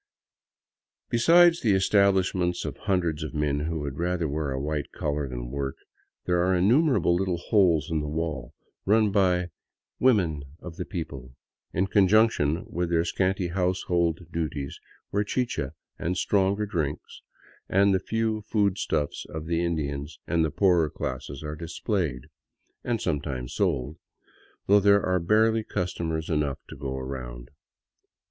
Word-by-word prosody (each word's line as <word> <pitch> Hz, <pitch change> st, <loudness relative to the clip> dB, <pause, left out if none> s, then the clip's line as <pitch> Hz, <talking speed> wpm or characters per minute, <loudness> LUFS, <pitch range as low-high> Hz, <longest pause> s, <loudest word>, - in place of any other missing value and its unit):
Besides 170 Hz, +8 st, +5 dB
the 105 Hz, -4 st, +3 dB
establishments 95 Hz, -2 st, +2 dB
of -, -, -4 dB
hundreds 85 Hz, -5 st, -1 dB
of 80 Hz, +1 st, -5 dB
men 75 Hz, -1 st, 0 dB
who 80 Hz, +1 st, -2 dB
would 70 Hz, 0 st, -5 dB
rather 85 Hz, -1 st, 0 dB
wear 75 Hz, 0 st, -2 dB
a 65 Hz, 0 st, -2 dB
white 75 Hz, 0 st, -3 dB
collar 75 Hz, -1 st, -2 dB
than -, -, -6 dB
work, 70 Hz, -1 st, -3 dB, 0.5 s
there 90 Hz, -1 st, +2 dB
are 95 Hz, +1 st, +2 dB
innumerable 120 Hz, -, +3 dB
little 90 Hz, 0 st, 0 dB
holes 85 Hz, -, +2 dB
in 80 Hz, -, +1 dB
the 75 Hz, -, -3 dB
wall, 75 Hz, -5 st, -4 dB, 0.3 s
run 105 Hz, +1 st, +3 dB
by 90 Hz, -3 st, +2 dB, 0.2 s
'' -, -, -64 dB
women 85 Hz, -, +1 dB, 0.2 s
of 85 Hz, -2 st, -9 dB
the 90 Hz, -, -4 dB
people 70 Hz, -8 st, -7 dB, 0.2 s
" -, -, -59 dB
in 95 Hz, +3 st, +1 dB
conjunction 95 Hz, -6 st, +3 dB
with 85 Hz, 0 st, -2 dB
their 85 Hz, 0 st, +2 dB
scanty 95 Hz, 0 st, 0 dB
household 90 Hz, -2 st, 0 dB
duties, 75 Hz, -4 st, -3 dB, 0.3 s
where 100 Hz, +1 st, +1 dB
chicha 100 Hz, -, -2 dB, 0.3 s
and 90 Hz, +2 st, -1 dB
stronger 100 Hz, +2 st, +1 dB
drinks, 80 Hz, -8 st, -4 dB, 0.5 s
and 100 Hz, +1 st, +4 dB
the 95 Hz, -, +3 dB
few 110 Hz, +2 st, -1 dB
food 100 Hz, -2 st, 0 dB
stuffs 75 Hz, -2 st, -2 dB
of 80 Hz, 0 st, -6 dB
the 85 Hz, +1 st, 0 dB
Indians 75 Hz, -3 st, -3 dB
and 85 Hz, 0 st, +1 dB
the 80 Hz, -, +1 dB
poorer 85 Hz, -2 st, +3 dB
classes 65 Hz, +2 st, -5 dB
are 75 Hz, 0 st, -4 dB
displayed 80 Hz, -, -2 dB, 0.3 s
— -, -, -47 dB
and 120 Hz, -2 st, -1 dB
sometimes 70 Hz, -8 st, -3 dB
sold, 75 Hz, +6 st, -1 dB, 0.7 s
though 100 Hz, +1 st, +6 dB
there 100 Hz, 0 st, +4 dB
are 90 Hz, 0 st, +2 dB
barely 110 Hz, +5 st, +3 dB
customers 80 Hz, -5 st, -3 dB
enough 75 Hz, -4 st, 0 dB
to -, -, -10 dB
go 65 Hz, -1 st, -4 dB
round. 65 Hz, -2 st, -7 dB
85 Hz, 150 wpm, -26 LUFS, 75-95 Hz, 0.7 s, though